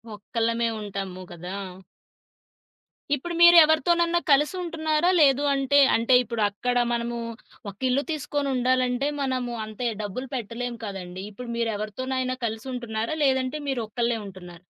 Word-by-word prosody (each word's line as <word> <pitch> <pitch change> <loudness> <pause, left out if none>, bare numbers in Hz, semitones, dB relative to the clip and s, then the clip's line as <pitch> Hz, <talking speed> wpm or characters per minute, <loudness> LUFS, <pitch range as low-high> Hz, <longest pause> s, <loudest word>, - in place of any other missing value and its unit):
ఒక్కళ్ళమే 230 +2 -1
ఉంటాము 195 -2 -5
గదా! 175 +2 -7 1.6
ఇప్పుడు 340 +5 -5
మీరు 345 0 +9
ఎవరితోనన్నా 340 +3 +2
కలిసుంటున్నారా? 315 +1 +1
లేదు 280 -1 +4
అంటే 275 +1 +3 0.2
అంటే, 235 +3 +3
ఇప్పుడు 235 -1 -4
అక్కడ 245 +5 -2 0.2
మనము 235 0 -2 0.5
ఒక 200 - -11
ఇల్లు 270 +3 +1
తీసుకొని 290 -2 -2
ఉండాలంటే 255 +1 +1
మనము 255 -3 -2
అంత 215 -1 -12 0.2
డబ్బులు 245 +6 -5
పెట్టలేం 240 +1 -4
కదండీ! 190 -2 -7
ఇప్పుడు 240 +4 -9
మీరు 230 -1 0
ఎవరితోనైనా 255 +5 -3
కలిసుంటున్నారా? 230 +2 -3
లేదంటే 265 +1 +1
మీరొక్కళ్ళే 235 -1 -1
ఉంటున్నార? 180 -3 -11
245 Hz, 120 wpm, -25 LUFS, 220-275 Hz, 1.6 s, మీరు